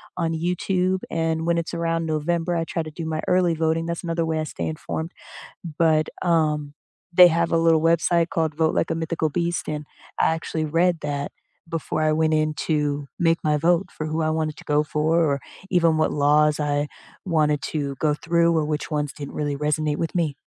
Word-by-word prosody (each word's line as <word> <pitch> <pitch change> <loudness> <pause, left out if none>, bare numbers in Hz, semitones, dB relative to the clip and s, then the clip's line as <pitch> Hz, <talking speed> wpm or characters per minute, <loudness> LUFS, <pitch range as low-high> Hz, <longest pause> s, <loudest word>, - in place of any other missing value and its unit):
on 165 -2 -1
YouTube, 180 +2 0
and 160 0 -1
when 170 0 +2
it's 170 0 -3
around 165 -1 -1
November, 165 +2 -1
I 165 - 0
try 165 0 -3
to 155 - -8
do 165 +2 -6
my 155 -1 -2
early 180 -2 +3
voting, 160 0 0
that's 170 +1 -4
another 165 -1 -1
way 160 -1 -1
I - - -1
stay - - -5
informed. 160 +1 -4 0.7
But, 155 -2 +3
um, 155 -4 +1 0.4
they 180 +1 +9
have 170 0 +1
a 165 - +3
little 165 -1 +4
website 170 +1 +2
called 160 -2 -1
Vote 160 0 +1
Like - - +1
a - - 0
Mythical 160 -1 -1
Beast, 170 +2 -2
and 150 -1 -4 0.3
I - - +4
actually 160 -1 -3
read 170 +2 +2
that 145 -1 -3 0.4
before 165 -1 -3
I 155 0 +3
went 160 0 +2
in 155 0 +1
to 145 -2 0
make 165 -1 +3
my 150 -1 +2
vote 170 +4 +2
for 155 - -5
who 155 +1 -2
I 155 - +1
wanted 155 -1 -1
to - - -12
go 150 0 +2
for, 155 +2 +1
or 140 -4 +1 0.3
even 170 -3 +3
what 155 - +2
laws 150 +1 +3
I 145 0 0 0.4
wanted 150 -5 +1
to 140 -3 -3
go 150 -1 +2
through, 170 +2 +2
or 155 -2 +1
which 150 -1 -3
ones 150 -1 -1
didn't 145 -2 -8
really 145 -1 -2
resonate 150 0 0
with 165 +2 -3
me 155 -5 0
160 Hz, 205 wpm, -23 LUFS, 150-165 Hz, 0.7 s, they